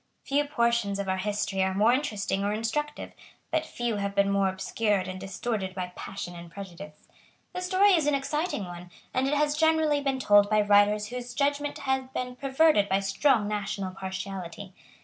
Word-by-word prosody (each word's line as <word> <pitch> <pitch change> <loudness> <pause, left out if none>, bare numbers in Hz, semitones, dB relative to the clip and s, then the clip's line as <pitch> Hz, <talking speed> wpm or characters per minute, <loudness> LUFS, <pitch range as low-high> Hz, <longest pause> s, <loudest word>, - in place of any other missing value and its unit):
Few 285 +1 +1
portions 235 -7 +1
of 200 -1 -3
our 190 0 0
history 205 -1 -1
are 190 0 +1
more 215 +4 +4
interesting 210 -8 -1
or 205 - 0
instructive; 230 +8 -3 0.4
but 315 0 0
few 240 -6 -2
have 200 0 -3
been 200 0 +3
more 195 -1 +2
obscured 190 +1 -1
and 185 0 -6
distorted 195 0 -3
by 180 -1 -4
passion 190 -2 -6
and 170 0 -10
prejudice. 195 +1 -10 0.5
The 365 - -4
story 380 +2 +4
is 320 -5 +2
an 295 - +3
exciting 280 - -2
one; 175 0 -9 0.2
and 260 +1 +1
it 290 - +1
has 295 0 +2
generally 315 -2 +3
been 275 -1 0
told 205 -5 +5
by 215 0 +4
writers 205 +1 +4
whose 245 0 -6
judgment 285 +1 0
had 265 -1 -2
been 250 0 -3
perverted 275 -4 +3
by 190 - +3
strong 205 +3 +2
national 200 -2 -3
partiality. 190 0 -6
210 Hz, 180 wpm, -27 LUFS, 195-280 Hz, 0.5 s, told